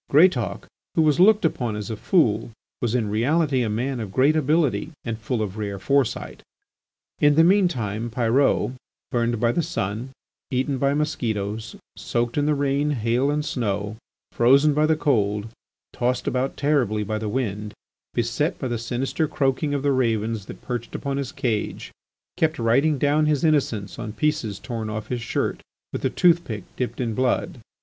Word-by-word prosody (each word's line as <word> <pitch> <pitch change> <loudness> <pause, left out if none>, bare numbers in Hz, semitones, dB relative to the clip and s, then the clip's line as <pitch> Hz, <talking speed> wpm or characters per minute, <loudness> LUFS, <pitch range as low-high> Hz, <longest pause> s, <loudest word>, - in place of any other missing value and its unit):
Greatauk, 145 - +3 0.3
who 160 - +4
was 155 +1 +3
looked 210 +1 +6
upon 120 -8 -1
as 105 0 -5
a - - -2
fool, 115 - +2 0.3
was 120 -1 0
in 115 -4 +1
reality 135 +5 +2
a 115 - 0
man 125 +4 -2
of 105 -4 -5
great 135 +8 +3
ability 150 -5 +1 0.2
and 115 -2 -3
full 115 0 -1
of 105 +1 -5
rare 100 -2 -3
foresight. 140 +4 0 0.8
In 145 0 +5
the 160 - +6
mean 190 +2 +5
time 115 - -3
Pyrot, 125 +3 +2 0.4
burnt 120 -1 0
by 120 0 +3
the 170 - +1
sun, 115 -2 -3 0.4
eaten 130 +1 -1
by 140 +1 +2
mosquitoes, 110 -8 -2 0.2
soaked 120 0 -2
in 145 0 +1
the 150 - +3
rain, 140 +1 +1
hail 125 0 +1
and 150 0 0
snow, 105 -5 -2 0.4
frozen 140 +5 +5
by 150 +1 +3
the 160 - +3
cold, 105 -8 0 0.4
tossed 125 +1 -1
about 130 +1 -1
terribly 125 -8 +1
by 110 +1 -2
the 110 -1 -3
wind, 105 -3 -2 0.4
beset 120 - 0
by 130 - -3
the 120 -2 -2
sinister 130 +6 -1
croaking 140 +1 0
of 140 - -2
the 145 - +3
ravens 115 -5 0
that - - -10
perched 120 -2 -4
upon 140 -1 -2
his 140 -3 -3
cage, 120 -6 -2 0.5
kept 160 -1 +1
writing 135 +6 +2
down 150 +3 +2
his 150 -3 +1
innocence 130 - 0
on 110 - -5
pieces 115 -5 -1
torn 115 -2 -5
off 110 -1 -5
his 125 -1 -2
shirt 115 - -2 0.3
with - - -4
a - - +2
tooth 170 -1 +4
pick 105 - -5
dipped 125 - -3
in 120 -3 -1
blood. 125 +1 0
125 Hz, 175 wpm, -24 LUFS, 110-145 Hz, 0.8 s, looked